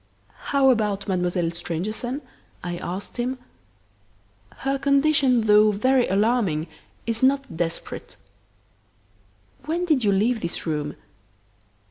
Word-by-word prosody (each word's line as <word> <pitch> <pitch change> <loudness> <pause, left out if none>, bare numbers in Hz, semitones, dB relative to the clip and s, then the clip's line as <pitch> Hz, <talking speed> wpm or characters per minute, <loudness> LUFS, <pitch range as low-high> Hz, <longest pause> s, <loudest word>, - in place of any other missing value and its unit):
"How 275 -2 +4
about 210 -4 0
Mademoiselle 180 -2 0
Stangerson?" 210 - -4 0.4
I 175 0 -3
asked 185 +7 -6
him. 250 +2 -1 1.3
"Her 275 0 +1
condition, 280 -3 +3
though 210 0 +5
very 255 +5 +2
alarming, 195 -6 +1 0.4
is 230 -1 -2
not 275 -6 +2
desperate." 165 0 -4 1.5
"When 335 +4 -1
did 305 -8 +2
you 205 - +3
leave 220 +4 +1
this 170 - -3
room?" 150 -2 -2
220 Hz, 105 wpm, -24 LUFS, 180-265 Hz, 1.5 s, though